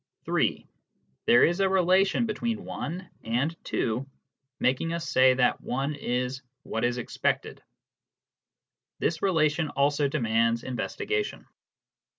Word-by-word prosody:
(3) - - 0 0.6
There 120 - +7
is 175 +3 0
a 195 -1 +3
relation 190 +4 +3
between 225 -1 -3
(1) 180 +4 -5 0.2
and 125 +9 0
(2), 115 +3 -1 0.6
making 135 +6 +1
us 170 0 -3
say 130 0 +5
that 125 -1 +2
(1) 135 +4 -2
is 125 -1 -2
" 135 +2 -55
what 110 - -3
is 120 0 +1
expected." 120 - -2 1.4
This 165 0 -1
relation 155 -4 +2
also 145 +1 +2
demands 115 -4 +1
investigation. 415 - -3
145 Hz, 120 wpm, -27 LUFS, 125-175 Hz, 1.4 s, There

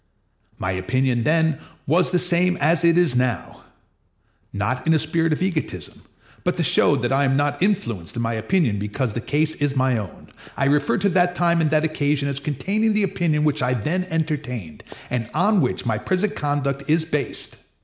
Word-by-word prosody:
My 90 - -2
opinion 120 +6 0
then 160 -1 +2 0.3
was 170 +6 +2
the 180 - +3
same 180 +1 +2
that 165 +1 +2
it 170 0 +4
is 175 -8 +3
now. 125 -2 -1 0.9
Not 125 +8 -2
in 160 - +5
a - - +5
spirit 160 +2 0
of 155 - 0
egotism, 155 - -3 0.4
but - - -1
to - - +1
show - - +3
that - - -1
I 135 +1 +2
am 135 -1 +2
not 145 +2 0
influenced 120 - -1
in 120 - -2
my 115 0 -1
opinion 110 - 0
because 105 +3 -2
the 120 - -3
case 155 +5 0
is 145 -1 -1
my 130 -3 +2
own, 100 -4 -9 0.3
I 135 - +1
refer 145 +1 +2
to 200 - +1
that 180 -1 +2
time 170 -1 +2
and 155 - +2
that 155 0 +2
occasion 145 -2 0
as 140 0 -3
containing 195 - 0
the 210 0 +2
opinion 165 -5 0
which 150 -2 +1
I 125 0 +1
then 175 - -2
entertained, 145 - -3 0.3
and 120 -2 -2
on 195 +4 +3
which 130 - -1
my 110 -3 0
present 190 - -1
conduct 140 -1 -2
is 160 +1 +2
based. 150 -3 -4
150 Hz, 190 wpm, -22 LUFS, 125-170 Hz, 0.9 s, in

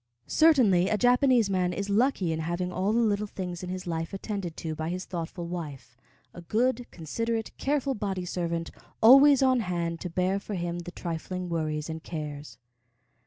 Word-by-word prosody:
Certainly 230 - +4
a 215 - +1
Japanese 250 -1 +4
man 180 -2 0
is 200 +2 -3
lucky 205 -4 +2
in 160 - -3
having 175 +3 -2
all 190 +3 0
the 230 - +2
little 210 -2 +1
things 180 -3 -5
in 180 - -6
his 185 0 -5
life 165 +2 -3
attended 195 -4 -5
to 160 -1 -4
by 155 +1 -4
his 185 +1 -4
thoughtful 170 0 -5
wife, 150 -8 -7 0.4
a 175 - -9
good, 240 +7 0
considerate, 225 +7 -3
careful 275 -1 0
body 195 -5 -3
servant, 170 -2 -3 0.3
always 275 +4 +8
on 260 -1 +4
hand 170 -5 -2
to 180 - -4
bear 185 +3 0
for 205 +1 -6
him 175 -1 -3
the 175 +1 -7
trifling 180 +1 -5
worries 155 -2 -2
and 160 0 -5
cares. 150 -7 -6
180 Hz, 175 wpm, -28 LUFS, 170-215 Hz, 0.4 s, always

